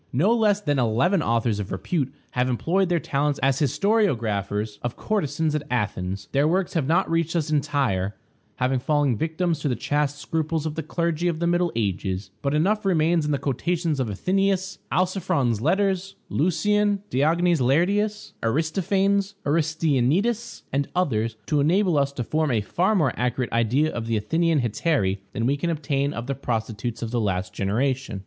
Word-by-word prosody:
No 180 - +3
less 215 -3 +3
than 145 -9 0
eleven 130 - +2
authors 115 -4 0
of 100 - -5
repute 135 - -2 0.2
have 125 +1 0
employed 170 - +1
their 175 -1 +2
talents 145 -1 -1
as 135 0 +3
historiographers 110 - 0
of 120 - -3
courtesans 160 -7 -1
at 150 - 0
Athens. 100 -5 -2
Their 140 +2 +3
works 180 +2 0
have 155 -6 0
not 175 +5 +2
reached 165 0 0
us 155 -2 0
entire, 135 -10 0 0.4
having 130 +1 0
fallen 145 -2 +1
victims 160 - -1
to 150 - -2
the 125 - 0
chaste 145 +1 -1
scruples 160 +1 -2
of 155 - -2
the 160 - -3
clergy 170 +2 -1
of 170 -2 0
the 170 - -1
Middle 175 0 +2
Ages; 95 -2 -2
but 140 +1 0
enough 205 +8 +2
remains 165 -4 +2
in - - 0
the 145 - +1
quotations 160 +3 -1
of 130 - 0
Athenæus, 190 - 0
Alciphron's 180 - +1
Letters, 195 - +1
Lucian, 200 +5 +1
Diogenes 165 +4 +2
Laertius, 200 - +1
Aristophanes, 190 - +1
Aristænetus, 160 - +1
and 140 0 +1
others, 115 -11 0
to 150 - +1
enable 175 +4 +3
us 140 0 +1
to 125 - -3
form 155 +5 0
a 115 -4 +1
far 180 - +1
more 155 -8 +2
accurate 125 0 -1
idea 125 +7 +2
of 115 -1 -4
the 115 -1 +1
Athenian 160 +8 +1
hetairæ 115 - 0
than 115 - -1
we 140 +3 +2
can 170 +4 -2
obtain 145 -3 -1
of 115 -4 -5
the 140 - -2
prostitutes 115 -2 -3
of 115 - -4
the 120 -1 0
last 95 -3 -2
generation. 120 +2 -1
150 Hz, 170 wpm, -24 LUFS, 120-175 Hz, 0.4 s, No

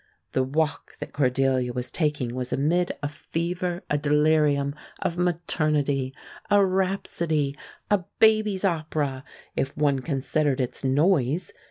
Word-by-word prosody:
The 130 - +1
walk 150 +4 -1
that - - -7
Cordelia 130 -2 +1
was 125 0 -4
taking 150 -7 -1
was 125 0 -3
amid 175 +6 +1
a - - +1
fever, 175 +4 -3
a 145 - 0
delirium, 150 -1 +3 0.3
of 170 - -1
maternity 150 -6 0 0.3
a 205 -1 +5
rhapsody, 170 -6 0 0.4
a 205 - +5 0.2
baby's 215 -3 +4
opera, 155 -6 -1 0.3
if 135 - -2
one 145 -2 +2
considered 140 0 0
its 125 +1 -2
noise. 145 +2 +2
150 Hz, 125 wpm, -25 LUFS, 135-175 Hz, 0.4 s, a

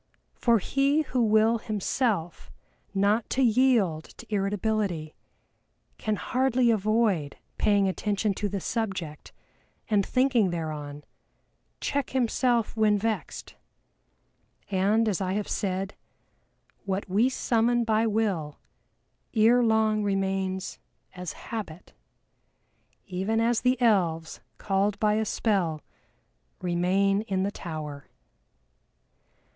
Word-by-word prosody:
For 235 -2 +3
he 275 +8 +1
who 255 -3 -1
will 220 +1 +3
himself 210 -4 -2 0.4
not 205 +3 +1
to 265 - +1
yield 225 -9 +3
to - - -11
irritability, 195 -5 -1 0.9
can 215 -1 -1
hardly 255 0 +1
avoid 215 -8 +1 0.2
paying 200 -2 +3
attention 205 +2 -1
to 205 +1 -3
the 200 0 -3
subject, 190 -8 -4 0.6
and 205 -2 +4
thinking 255 -4 +2
thereon, 150 -3 -5 0.8
check 280 -1 -1
himself 240 -2 +1
when 215 -2 +3
vexed. 220 +1 -3 1.2
And 205 +4 +2
as 200 -3 0
I 185 0 -1
have 205 0 -2
said, 195 0 -2 0.9
what 195 +1 -2
we 210 +7 +3
summon 240 -1 +1
by 225 0 +2
Will 200 -9 -1 0.8
ere 230 +3 +5
long 220 -2 +2
remains 190 -1 -2 0.3
as 180 -4 -6
Habit, 195 -7 -7 1.1
even 195 +4 -1
as 230 0 +2
the 250 0 +2
Elves, 175 -9 +1 0.2
called 200 +1 0
by 210 -1 +3
a 220 +1 0
spell, 185 -9 0 0.8
remain 185 +3 +1
in 190 -1 0
the 200 - -1
Tower. 155 -6 -7
205 Hz, 105 wpm, -27 LUFS, 185-225 Hz, 1.2 s, ere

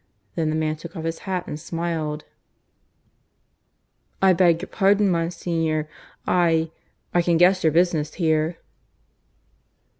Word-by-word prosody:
Then 160 -2 -1
the 155 - -1
man 155 -1 -1
took 165 +2 -10
off 160 - -5
his 165 0 -3
hat 180 -2 -1
and 150 - -6
smiled. 160 -2 -3 1.9
"I 190 -1 +5
beg 170 -2 +3
your - - -5
pardon, 200 0 +3
Monsignor... 165 -2 -1 0.4
I... 165 -2 +2 0.4
I 175 - +4
can 170 -1 +2
guess 185 +2 +4
your 160 - +4
business 165 -2 +1
here." 160 -1 +1
165 Hz, 125 wpm, -23 LUFS, 160-175 Hz, 1.9 s, I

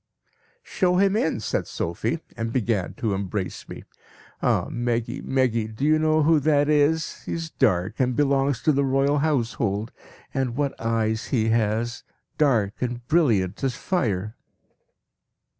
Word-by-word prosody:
"'Show 180 -2 +1
him 195 +2 +3
in!' 160 - 0
said - - -2
Sophie, 110 - -3
and 115 0 -3
began 115 -6 -1
to 115 -7 -1
embrace 95 0 -4
me. - - -8 0.6
'Ah! - - +1
Meggy, 120 -1 -2
Meggy, 125 -4 0
do 110 +6 -4
you 155 +1 +4
know 155 0 +3
who 160 0 +4
that 145 0 +2
is? 150 +1 +1
He - - -3
is 165 -1 -4
dark, 95 -6 +1
and 125 -1 +1
belongs 140 -2 +1
to 155 - +4
the 140 -1 +1
Royal 135 +2 +2
Household; 115 -7 -1 0.4
and 130 -3 -1
what 140 0 0
eyes 110 -1 0
he 115 -4 +1
has! 115 +1 0 0.4
Dark 115 -9 +2
and 120 -1 -3
brilliant 115 - +2
as 130 -2 0
fire.' 110 - -1
125 Hz, 145 wpm, -24 LUFS, 110-145 Hz, 0.6 s, you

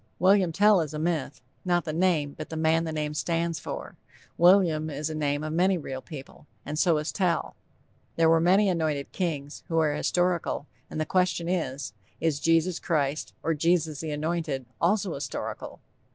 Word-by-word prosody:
William 190 -1 +4
Tell 205 +2 +5
is 155 -1 -4
a - - -2
myth 155 -4 -2 0.2
not 175 -1 +1
the 155 - -3
name, 160 -4 +1
but - - -7
the 160 - -5
man 160 +1 +2
the 160 - -3
name 150 -1 -2
stands 165 +1 -1
for. - - -7 0.4
William 170 -3 +4
is 150 +1 -3
the - - -4
name 145 -1 -1
of 155 0 -3
many 185 +3 +3
real 135 -5 -6
people, 145 -1 -11 0.2
and 150 +1 -3
so 170 -3 +4
is 150 +1 -2
Tell. 180 -4 0 0.6
There 165 -1 +4
were 165 0 +5
many 190 +5 +4
anointed 155 -6 -1
kings, 150 -6 -3
who 165 -3 -1
are 155 -2 +3
historical, 175 0 0 0.2
and - - -5
the 155 - 0
question 180 -2 +1
is, 145 - -2 0.3
Is 155 -3 0
Jesus 165 +2 +2
Christ 150 -3 -1
or 165 - +1
Jesus 160 -1 +1
the 160 - -4
Anointed 150 -3 -2 0.2
also 190 0 +2
historical? 140 - -5
160 Hz, 180 wpm, -27 LUFS, 150-175 Hz, 0.6 s, Tell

